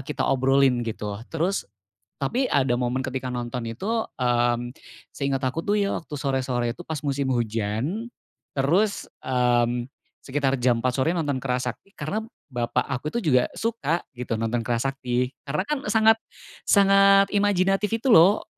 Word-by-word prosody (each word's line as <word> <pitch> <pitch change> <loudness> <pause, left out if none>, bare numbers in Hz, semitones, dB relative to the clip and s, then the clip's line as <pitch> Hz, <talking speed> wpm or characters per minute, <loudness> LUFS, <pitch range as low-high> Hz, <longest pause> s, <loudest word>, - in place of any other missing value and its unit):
kita 150 - -1
obrolin 135 -1 +3
gitu 105 -3 -4
loh. 100 - -7
Terus, 170 +5 -1 0.5
tapi 245 - 0
ada 130 -3 +3
momen 125 +1 -1
ketika 130 0 -4
nonton 120 0 -4
itu, 115 - -6 0.3
mmm, 120 0 +1 0.4
seinget 140 -1 -1
aku 130 +5 -1
tuh 205 - 0
ya, 200 - 0
waktu 155 - -10
sore-sore 130 -4 -1
itu 175 - -8
pas 160 -3 -4
musim 140 -1 0
hujan, 115 - -2 0.5
terus, 180 +10 +1 0.2
mmm, 120 -1 +1 0.3
sekitar 135 -1 0
jam 120 -2 +2
4.00 125 -1 +1
sore 160 +6 +2
nonton 145 -5 -1
Kera 125 -2 0
Sakti 125 +10 -6
karena 160 +9 -2 0.3
bapak 120 0 0
aku 130 +4 -2
tuh 235 - 0
juga 125 -5 +3
suka 220 -8 -1 0.2
gitu, 120 -2 -3
nonton 115 +1 0
Kera 120 +1 0
Sakti 125 -1 -1 0.2
karena 150 +6 0
kan 300 - 0
sangat 220 0 +5 0.5
sangat 195 0 +6
imajinatif 195 0 +2
itu 230 +4 -1
loh, 190 +5 +6
135 Hz, 155 wpm, -25 LUFS, 120-180 Hz, 0.5 s, sangat